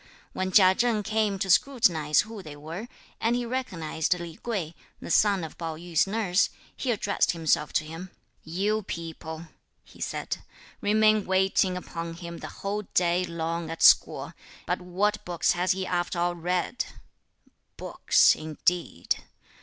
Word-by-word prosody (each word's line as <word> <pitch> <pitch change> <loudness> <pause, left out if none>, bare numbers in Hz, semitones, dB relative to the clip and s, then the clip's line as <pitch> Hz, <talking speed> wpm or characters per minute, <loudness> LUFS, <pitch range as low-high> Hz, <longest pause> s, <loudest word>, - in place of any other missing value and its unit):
When 185 0 -2
Chia 185 -1 +7
Cheng 230 0 +1
came 215 -2 0
to 190 0 -2
scrutinise 170 - +3
who 220 -1 -8
they 155 -5 -9
were, 165 +9 -7 0.3
and 230 +2 +1
he 245 0 -1
recognised 180 -9 -1
Li 170 -2 -7
Kuei, 190 -9 -3 0.3
the - - -6
son 200 -2 +4
of 160 - -8
Pao 165 -2 -3
yü's 170 +1 0
nurse, 200 -1 +2 0.3
he 260 - -3
addressed 205 -5 +1
himself 160 -2 +1
to - - +2
him. 165 +4 -8 0.3
"You 200 +7 0
people," 165 -3 -7 0.4
he - - -17
said, - - -3 0.4
"remain 215 0 +3
waiting 190 0 +2
upon 165 -2 -6
him 170 0 -8
the - - -6 0.2
whole 205 +1 -1
day 180 0 +3
long 165 -1 -3
at 165 - -3
school, - - +5 0.3
but 180 +2 -1
what 200 +4 0
books 175 -2 +1
has 180 +1 +1
he 190 0 -3
after 175 0 -1
all 175 0 +1
read? 180 +6 -1 0.9
Books - - +4
indeed! 155 - -1
180 Hz, 150 wpm, -27 LUFS, 165-205 Hz, 0.9 s, Chia